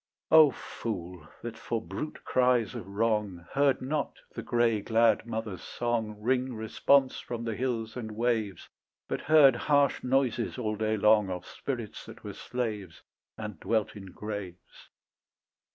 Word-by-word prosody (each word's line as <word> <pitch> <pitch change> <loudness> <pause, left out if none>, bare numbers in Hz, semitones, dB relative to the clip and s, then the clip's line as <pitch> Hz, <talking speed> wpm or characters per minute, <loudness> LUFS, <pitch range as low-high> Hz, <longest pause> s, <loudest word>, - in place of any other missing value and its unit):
O 160 -2 +9
fool, 90 - -6 0.2
that 115 -1 -5
for 115 - -2
brute 110 +8 -6
cries 125 -3 +2
of - - -7
wrong 105 -4 -1
Heard 140 -2 +2
not 145 +2 -2 0.2
the 115 - -5
grey 115 -2 +2
glad 115 +1 +3
mother's 110 -4 -4
song 115 -3 -2
Ring 125 +2 0
response 130 +5 +2
from 120 -1 -5
the 115 -1 -2
hills 115 -2 -2
and 110 -4 -5
waves, 110 -5 -1 0.4
But - - -3
heard 145 -4 +6
harsh 140 +2 +2
noises 130 -3 +1
all 110 -4 -1
day 110 0 0
long 105 -1 +4
Of 90 -1 -5
spirits 120 -6 -5
that - - -12
were - - -6
slaves 110 -8 -4 0.3
And 105 -6 -6
dwelt 110 -2 0
in 100 -2 -9
graves. 95 -1 -8
115 Hz, 145 wpm, -29 LUFS, 105-125 Hz, 0.4 s, O